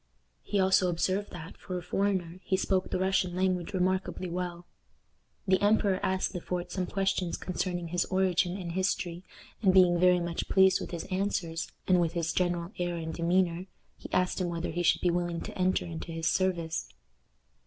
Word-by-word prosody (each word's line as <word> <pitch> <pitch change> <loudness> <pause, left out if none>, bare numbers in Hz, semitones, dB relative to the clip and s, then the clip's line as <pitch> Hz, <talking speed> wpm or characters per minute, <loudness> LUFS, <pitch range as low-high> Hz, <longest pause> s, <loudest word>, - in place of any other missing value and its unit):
He 205 - -1
also 190 -1 +4
observed 185 +4 0
that, 175 0 -9
for 185 -2 -5
a 175 - -6
foreigner, 185 -2 -1
he 190 - +1
spoke 190 -1 0
the - - -1
Russian 185 -1 +1
language 185 -1 0
remarkably 185 0 -1
well. 175 -1 -4 0.8
The 190 0 +3
emperor 205 -2 +3
asked 190 0 0
Le 180 - -4
Fort 180 0 -4
some 185 -1 -2
questions 195 -3 -1
concerning 175 -1 -3
his 175 +1 0
origin 185 -1 +1
and 175 -3 -5
history, 180 -1 -1 0.4
and, 195 -4 +5
being 180 -2 +5
very 180 0 +5
much 170 -1 -3
pleased 190 -1 +5
with - - -5
his 170 -2 -5
answers, 185 -4 -2 0.2
and 180 -1 +4
with 165 -1 0
his 165 -1 -1
general 175 0 0
air 175 -1 -1
and 160 -1 -4
demeanor, 175 +1 +1 0.3
he - - -11
asked 180 +1 +1
him 180 - 0
whether 170 0 -3
he 175 +2 -2
should 175 - +3
be 175 - +3
willing 175 -1 -1
to - - -7
enter 185 0 +1
into 170 0 -6
his 165 0 -4
service. 170 -3 0
180 Hz, 185 wpm, -29 LUFS, 170-190 Hz, 0.8 s, and